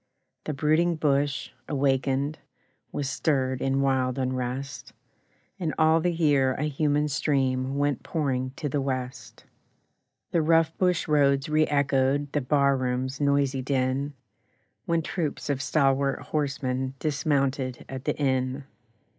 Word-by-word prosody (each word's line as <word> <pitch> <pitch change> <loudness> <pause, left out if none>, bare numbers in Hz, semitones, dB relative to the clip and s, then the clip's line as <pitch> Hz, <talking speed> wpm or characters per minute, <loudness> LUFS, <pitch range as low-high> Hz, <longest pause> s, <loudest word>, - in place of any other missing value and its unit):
The 155 - -2
brooding 155 +4 +2
bush, 145 -2 0 0.2
awakened, 135 +1 0 0.5
Was 145 - -2
stirred 130 -2 0
in 135 0 +1
wild 130 -1 +1
unrest, 130 +1 -3 0.7
And 165 -4 -2
all 160 +1 +4
the 175 +2 +1
year 145 -6 +2
a 150 - -2
human 150 0 +1
stream 135 -2 0
Went 145 -3 0
pouring 130 -5 -1
to 150 - -3
the 145 0 -1
West. 130 -1 -5 0.9
The 170 - +2
rough 165 0 +3
bush 180 -1 +1
roads 140 -2 +3
re 155 0 +3
echoed 140 0 +1
The 145 - 0
bar 140 +1 +3
room's 130 +1 -2
noisy 140 -2 +2
din, 135 +2 -1 0.7
When 165 -1 +1
troops 155 -3 -3
of 135 -1 -2
stalwart 135 -1 +2
horsemen 130 -3 -1
Dismounted 140 -3 -1
at 130 0 -7
the - - -1
inn. 130 -1 0
140 Hz, 130 wpm, -26 LUFS, 130-150 Hz, 0.9 s, all